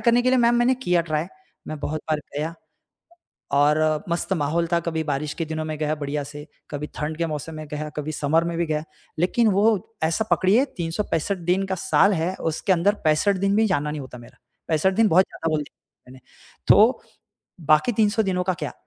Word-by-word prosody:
करने 240 0 +3
के 255 - +2
लिए 260 - +3
मैम 235 0 +4
मैंने 245 +2 +3
किया 175 -1 +3
ट्राई 155 0 +1 0.4
मैं 155 - -5
बहुत 155 +1 -3
बार 155 - +2 0.2
गया 155 +3 -2 1.1
और 150 +1 +4 0.3
मस्त 170 +3 -1
माहौल 165 +1 0
था। 170 - +4
कभी 160 -1 -1
बारिश 145 +1 -2
के - - 0
दिनों 155 0 -4
में 155 -1 -4
गया 155 0 0
बढ़िया 145 0 -3
से 145 +1 -9 0.2
कभी 150 0 -5
ठंड 155 +1 -3
के 170 - 0
मौसम 155 +1 -5
में 155 0 -7
गया 150 0 -4
कभी 150 +1 -3
समर 155 +2 +1
में 170 0 -3
भी 170 - +1
गया। 155 -1 -2 0.4
लेक़िन 220 +7 +2
वो 210 +2 +1
ऐसा 165 +7 +1
पकड़िए 215 +9 +4
365 170 +1 -2
दिन 195 +2 +1
का 190 - -2
साल 200 +1 +4
है, 170 +1 -1
उसके 165 +4 0
अंदर 185 +4 +2
65 160 +6 +3
दिन 195 +1 +1
भी 220 +1 +4
जाना 150 -5 0
नहीं 150 -1 -5
होता 130 -2 -10
मेरा। 120 -1 -15 0.3
65 165 +4 +2
दिन 225 +2 +4
बहुत 185 0 +5
ज़्यादा 165 - -4
बोल 155 -1 0
दिया 125 -2 -21
मैंने। 130 - -13 0.5
तो 220 +6 +5 0.6
बाकी 155 - +4
300 220 +1 +2
दिनों 180 -2 0
का 185 - 0
क्या? 160 -5 -5
165 Hz, 205 wpm, -23 LUFS, 150-195 Hz, 1.1 s, बहुत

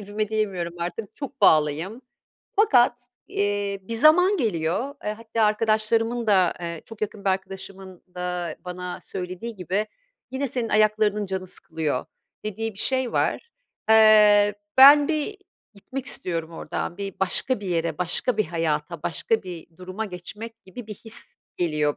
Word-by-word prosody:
evime 205 +1 -3
diyemiyorum 195 -6 -2
artık, 180 +5 -5
çok 275 -2 -7
bağlıyım. 160 - +3 0.5
Fakat, 245 - +3 0.2
eee, 205 0 -1
bir 230 +5 -5
zaman 350 - +6
geliyor, 220 - -1
eee, 210 - -1
hatta 225 0 -1
arkadaşlarımın 225 +2 +1
da, 190 -5 +4
eee, 170 -2 -5
çok 225 -2 -11
yakın 210 -1 -4
bir 195 - +3
arkadaşımın 190 -1 -6
da 180 -2 -3
bana 180 0 -6
söylediği 185 +5 -6
gibi, 190 +4 -1 0.4
"Yine 265 +1 -2
senin 235 -1 -2
ayaklarının 215 -1 +2
canı 190 -1 -4
sıkılıyor." 160 -6 -3 0.4
dediği 215 +1 -4
bir - - -17
şey 260 +1 0
var. 465 - -1 0.4
Eee, 210 -2 +7 0.2
ben 285 +2 +9
bir 325 +6 -1 0.4
gitmek 255 +6 -7
istiyorum 165 -2 -2
oradan, 170 - -4
bir 195 -1 -5
başka 195 +6 +1
bir 200 - -7
yere, 170 -1 -1
başka 180 +7 0
bir 215 - +2
hayata, 160 -1 -2
başka 220 +6 0
bir 175 -3 -8
duruma 185 +4 -5
geçmek 215 +4 -9
gibi 210 +5 -10
bir 215 - -7
his 225 +2 -3 0.2
geliyor 150 -4 0
205 Hz, 145 wpm, -24 LUFS, 180-225 Hz, 0.5 s, ben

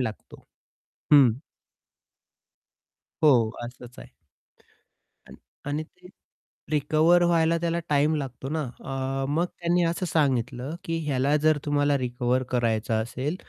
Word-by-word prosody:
लागतो. 110 -4 -6 0.7
हं. 135 -4 +8 1.9
हो, 120 -7 +5
असंच 125 0 -10
आहे. - - -12 1.2
अण - - -13 0.3
आणि 145 +2 -2
ते 180 +3 -18 0.6
रिकव्हर 155 +4 +3
व्हायला 170 -1 +2
त्याला 170 0 -1
टाईम 150 +2 +2
लागतो 135 -2 -5
ना 155 +1 -2 0.2
अ, 135 0 -3
मग 165 +4 +1
त्यांनी 175 0 -1
असं 170 +2 -1
सांगितलं, 135 -3 -1
की 165 0 -2
ह्याला 140 +1 +1
जर 155 -1 +4
तुम्हाला 145 -1 +2
रिकव्हर 125 0 -1
करायचं 115 -3 0
असेल, 130 +8 -4
145 Hz, 115 wpm, -25 LUFS, 125-160 Hz, 1.9 s, हं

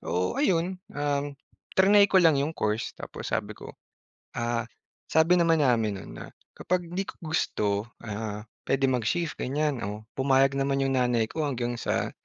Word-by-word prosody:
So 90 +3 -1
ayun, 180 +1 +1 0.2
um, 145 0 -1 0.4
triny 200 +1 +6
ko 190 - +2
lang 160 -5 +5
'yong 150 +3 -1
course. 105 +1 -1
Tapos - - -7
sabi - - -1
ko, - - -10 0.7
ah, 120 0 -1 0.4
sabi 160 +2 +4
naman 165 -3 +3
namin 110 -5 +2
no'n - - -11
na - - -8 0.3
kapag 180 -1 -1
hindi 195 +2 -2
ko - - -7 0.2
gusto, 105 -8 0 0.4
ah, 105 -1 -4 0.3
puwede 135 0 +2
mag-shift 130 +7 -1
ganyan. 145 -1 -1
Oh, 105 +1 -6 0.2
pumayag 135 0 +4
naman 135 0 +1
'yong 135 0 +1
nanay 120 -2 +2
ko 155 -2 -2
hanggang 120 -2 -2
sa - - -1
135 Hz, 160 wpm, -27 LUFS, 115-160 Hz, 0.7 s, triny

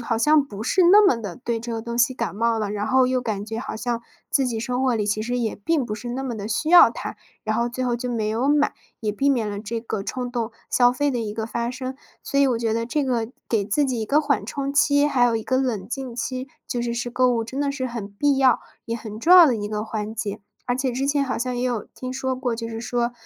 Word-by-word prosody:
好 230 -1 -1
像 300 +5 +5
不 210 -6 -8
是 370 +9 +3
那 415 +2 +8
么 260 - +4
地 205 -6 -6
对 235 -2 -3
这 235 +1 -5
个 225 - -3
东 235 0 -5
西 245 +2 +3
感 230 -5 -3
冒 230 +2 +1
了。 210 -2 -2
然 210 0 -2
后 260 +2 +4
又 255 0 +1
感 215 -4 -3
觉 220 +1 -5
好 265 - -5
像 235 +1 -2 0.3
自 270 -2 +2
己 235 -3 -2
生 250 +2 -1
活 255 -2 +2
里， 210 -2 -1
其 210 +1 0
实 245 +2 -2
也 230 -2 -1
并 290 +6 0
不 210 - -3
是 230 +3 -7
那 260 +2 -3
么 250 -3 -3
地 205 -1 -5
需 310 +9 -1
要 355 - +9
它， - - -6 0.3
然 215 0 0
后 235 +1 +1
最 255 +1 -3
后 245 -1 +1
就 250 +1 -4
没 225 -3 -1
有 235 +5 0
买， 290 0 +3 0.3
也 215 - -1
避 270 +7 +1
免 240 -6 +1
了 205 - -4
这 225 +2 -4
个 220 -3 -4
冲 250 +2 -4
动 235 -2 -3 0.2
消 245 -1 +5
费 290 +3 0
的 250 - -1
一 215 -2 -3
个 220 0 -2
发 235 +1 -2
生。 255 +1 -5 0.3
所 280 - -1
以 280 - +5
我 245 -3 +1
觉 230 -1 0
得 230 +1 -1
这 295 +3 0
个 235 -4 0 0.2
给 220 -4 +1
自 225 +9 +1
己 255 -4 -1
一 220 - -3
个 290 +5 +3
缓 280 -9 0
冲 275 +3 -3
期， 285 0 +4
还 255 -4 +3
有 240 -1 +3
一 220 - -3
个 260 - 0
冷 240 -8 -1
静 255 -1 -5
期， 255 +2 -3 0.2
就 245 - -2
是 235 0 -2
是 240 0 -3
购 255 +1 +3
物 230 - 0
真 260 +5 -5
的 285 -1 +1
是 265 -2 -3
很 230 -4 -5
必 280 +6 +2
要， 265 -1 +4 0.3
也 230 - -2
很 215 -2 -8
重 345 +10 +7
要 355 - +11
的 250 -5 +2
一 205 -1 -3
个 210 0 -2
环 215 -1 -4
节。 210 -1 -4 0.2
而 245 0 0
且 260 -1 -1
之 265 +3 -1
前 285 -1 +2
好 265 - -2
像 250 +1 -2
也 245 - -1
有 240 -4 -1
听 255 0 -6
说 260 0 -2
过， 250 -2 -1
就 230 0 -5
是 225 0 -5
说， 240 +1 -1
240 Hz, 305 characters per minute, -23 LUFS, 225-260 Hz, 0.3 s, 要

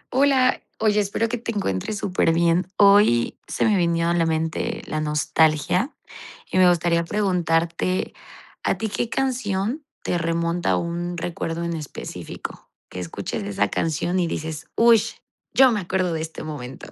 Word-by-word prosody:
Hola. 265 -2 +3 0.2
Oye, 210 -1 +2
espero 205 +3 0
que 240 +1 -3
te 230 0 -3
encuentres 195 - -2
superbién. 170 -1 +2
Hoy, 200 - +5
se 155 - 0
me 215 - +3
vino 170 -2 +1
a - - +2
la 170 -1 +2
mente 160 +8 -2
la 155 - -3
nostalgia 155 - +1 0.6
y 185 - +2
me 180 -1 +7
gustaría 170 -1 +2
preguntarte, 175 -2 0 0.5
¿a - - +1
ti 220 - -2
qué 225 - -2
canción 245 0 -1 0.2
te 175 - 0
remonta 170 +1 -1
a - - +3
un 175 +1 -3
recuerdo 165 0 -3
en 170 0 -2
específico? 150 -3 -7 0.2
Que 90 - -7
escuches 90 -2 -4
esa 100 0 0
canción 170 +3 -1
y 175 - +1
dices: 160 -1 -5
"Uy, 230 -2 +6 0.5
yo 265 -1 +6
me 215 - 0
acuerdo 185 -2 -1
de 160 - -2
este 160 0 -6
momento". 140 -5 -8
175 Hz, 155 wpm, -23 LUFS, 160-205 Hz, 0.6 s, me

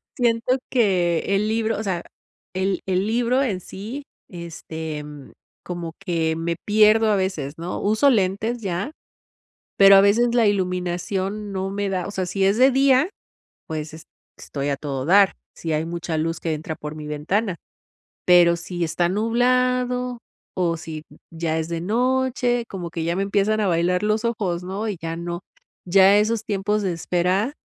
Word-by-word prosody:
Siento 240 +1 +1
que 180 -8 +2 0.2
el 210 +2 +1
libro, 225 0 0
o 220 - -3
sea, 185 -4 -2 0.5
el 190 +1 0
el 190 +1 0
libro 245 +4 +2
en 205 -9 -1
sí, 215 +10 -7 0.3
este, 160 -3 -6
mm, 145 -2 -11 0.3
como 175 -2 -5
que 165 -4 -1
me 170 +1 -2
pierdo 215 +1 +5
a 205 - +3
veces, 165 -7 -2
¿no? 170 +2 -4
Uso 220 +7 +3
lentes 220 +1 0
ya, 195 - -3 0.9
pero 195 0 +9
a 195 - +7
veces 235 +4 +3
la 235 -2 +4
iluminación 190 +1 -1
no 190 0 -2
me 200 0 -2
da. 185 -2 -2
O - - -5
sea, 190 -2 -2
si 190 +2 0
es 200 +3 +3
de 260 +2 +6
día, 270 +3 +4 0.6
pues 155 -1 -5
es 160 0 -11 0.3
estoy 140 0 -4
a 140 - 0
todo 135 -2 -4
dar, 195 +4 +5 0.2
si 165 - -3
hay 155 +1 0
mucha 170 -1 -3
luz 165 +2 -1
que 165 -2 -2
entra 155 +1 -5
por 150 0 -7
mi 155 -1 -8
ventana. 180 +6 -1 0.7
Pero 175 -1 +6
si 175 +1 -5
está 170 +1 +1
nublado 250 +3 +1 0.4
o 170 -2 +1
si 160 -1 -8 0.3
ya 160 -1 -2
es 160 0 -3
de 170 -1 -3
noche, 245 +3 +1
como 175 -3 -6
que 165 -1 -4
ya 170 +1 0
me 195 - -1
empiezan 200 +2 +1
a 205 - +1
bailar 175 +2 +1
los 215 +1 0
ojos, 195 -7 -1
¿no? 195 +4 -3
Y 205 - -3
ya 165 0 -4
no. 170 +1 -5 0.4
Ya 195 +2 +6
esos 220 +1 +1
tiempos 205 +1 0
de 190 -3 0
espera, 180 - 0
190 Hz, 175 wpm, -23 LUFS, 170-220 Hz, 0.9 s, pero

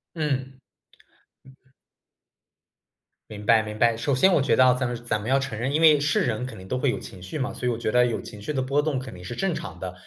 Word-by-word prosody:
嗯。 150 -5 0
嗯。 130 0 -13 2.7
明 105 -1 -8
白 115 -1 +5
明 105 0 -7
白。 115 0 +3
首 135 +4 0
先 190 +8 +4
我 - - +3
觉 140 - +2
得 130 - +5
啊， 125 - +6
咱 130 0 -1
们 120 - -3
咱 105 -3 -1
们 110 - -5
要 135 - +4
承 125 -5 -3
认， 130 +4 -1
因 155 - +1
为 155 -3 +7
是 145 0 +1
人 120 0 -1
肯 115 -4 -8
定 95 - -11
都 125 - -2
会 135 +1 +1
有 - - -1
情 90 - -10
绪 90 +11 -6
嘛， 130 - -2
所 125 - -4
以 125 - +2
我 115 - -2
觉 110 -1 -2
得 125 +1 +4
有 120 - -2
情 105 -3 -11
绪 150 - -4
的 130 - 0
波 140 +3 +1
动 150 -3 -1
肯 130 - -8
定 90 - -11
是 120 - -6
正 195 -2 -1
常 120 - -6
的。 90 -1 -5
125 Hz, 285 characters per minute, -25 LUFS, 110-140 Hz, 2.7 s, 为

